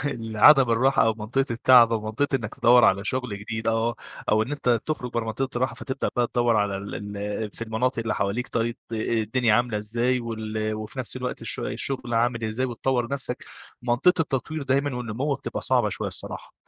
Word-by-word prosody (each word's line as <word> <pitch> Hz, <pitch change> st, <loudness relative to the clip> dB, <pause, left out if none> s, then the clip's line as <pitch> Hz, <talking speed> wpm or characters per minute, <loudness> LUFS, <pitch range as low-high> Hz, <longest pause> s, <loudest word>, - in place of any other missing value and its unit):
العدم 115 Hz, +4 st, +5 dB
الراحة 130 Hz, +4 st, +3 dB
أو 110 Hz, -, +2 dB
منطقة 120 Hz, +6 st, -1 dB
التعب 120 Hz, 0 st, +6 dB
أو 115 Hz, -, +1 dB
منطقة 115 Hz, +7 st, 0 dB
إنك 110 Hz, -5 st, -6 dB
تدوّر 120 Hz, +1 st, +5 dB
على 100 Hz, +1 st, +3 dB
شغل 125 Hz, -4 st, -3 dB
جديد، 110 Hz, +1 st, -5 dB
آه، 115 Hz, +1 st, +1 dB, 0.3 s
أو 110 Hz, +1 st, +4 dB
إن 125 Hz, +6 st, -5 dB
أنت 125 Hz, -5 st, +1 dB
تخرج 135 Hz, -6 st, -3 dB
برّه 120 Hz, -, -1 dB
منطقة 130 Hz, +5 st, -2 dB
الراحة 130 Hz, +2 st, 0 dB
فتبدأ 135 Hz, 0 st, -3 dB
بقى 120 Hz, -1 st, +3 dB
تدوّر 120 Hz, -1 st, +1 dB
على 105 Hz, -2 st, +1 dB
ال 100 Hz, +1 st, -6 dB
ال 105 Hz, +1 st, -3 dB
في -, -, -7 dB
المناطق 115 Hz, +3 st, -1 dB
اللي 115 Hz, -1 st, -1 dB
حواليك 100 Hz, +6 st, -1 dB
طيب 115 Hz, +1 st, -1 dB, 0.2 s
آآ، -, -, -1 dB
الدنيا 110 Hz, +1 st, +1 dB
عاملة 120 Hz, -2 st, +1 dB
إزاي، 120 Hz, +4 st, 0 dB
وال 110 Hz, -2 st, -3 dB
وفي 110 Hz, +4 st, -7 dB
نَفس 130 Hz, 0 st, -3 dB
الوقت 125 Hz, 0 st, -4 dB
الش -, -, -3 dB
الشغل 130 Hz, -3 st, -1 dB
عامل 115 Hz, 0 st, +1 dB
إزاي، 110 Hz, +4 st, -1 dB
وتطوَّر 120 Hz, 0 st, -1 dB
نَفسك. 135 Hz, -3 st, -3 dB, 0.4 s
منطقة 125 Hz, +9 st, +3 dB
التطوير 155 Hz, +1 st, -2 dB
دايمًا 140 Hz, 0 st, 0 dB
والنمو 125 Hz, +4 st, -2 dB
بتبقى -, -, -5 dB
صعبة -, -, +2 dB
شوية -, -, -3 dB
الصراحة. -, -, -8 dB
120 Hz, 190 wpm, -25 LUFS, 110-130 Hz, 0.4 s, التعب